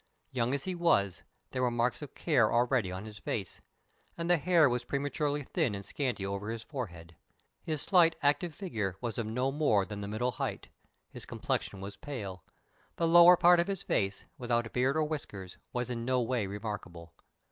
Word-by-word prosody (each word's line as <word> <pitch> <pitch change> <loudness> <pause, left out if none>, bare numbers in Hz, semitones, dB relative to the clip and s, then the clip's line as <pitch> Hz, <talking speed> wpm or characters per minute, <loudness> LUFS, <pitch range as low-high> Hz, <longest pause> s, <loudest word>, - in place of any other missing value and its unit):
Young 125 +1 0
as 140 - -3
he 185 - -2
was, 155 - +2 0.3
there 130 - -2
were 125 - +3
marks 120 +3 0
of 145 - -9
care 130 -10 +3
already 120 -4 +2
on 95 +3 -6
his 105 -1 -10
face, 100 -4 -4 0.6
and 170 0 -3
the 175 0 +5
hair 165 -1 +4
was 120 -1 -1
prematurely 145 +2 -1
thin 115 -4 0
and 100 0 -7
scanty 125 -9 -2
over 100 +2 -3
his 115 0 -4
forehead. 85 - -7 0.5
His 155 -3 -3
slight, 170 -4 +5
active 150 +3 +2
figure 110 - -3
was 120 +1 -3
of 115 - -2
no 125 +4 0
more 135 -9 +2
than 105 0 -6
the 100 - -4
middle 115 +5 -1
height. - - -4 0.4
His - - -10
complexion 95 - -3
was 100 +1 -7
pale. 100 - -6 0.5
The 165 - +1
lower 175 +1 +8
part 175 0 +6
of 170 - +2
his 195 -2 -3
face, 100 0 -1
without 120 -2 -1
beard 130 +4 +2
or 155 - +3
whiskers, 105 - -5
was 125 0 -2
in 115 -1 -3
no 130 +1 +1
way 120 -3 0
remarkable. 95 -5 -6
125 Hz, 190 wpm, -31 LUFS, 105-150 Hz, 0.6 s, lower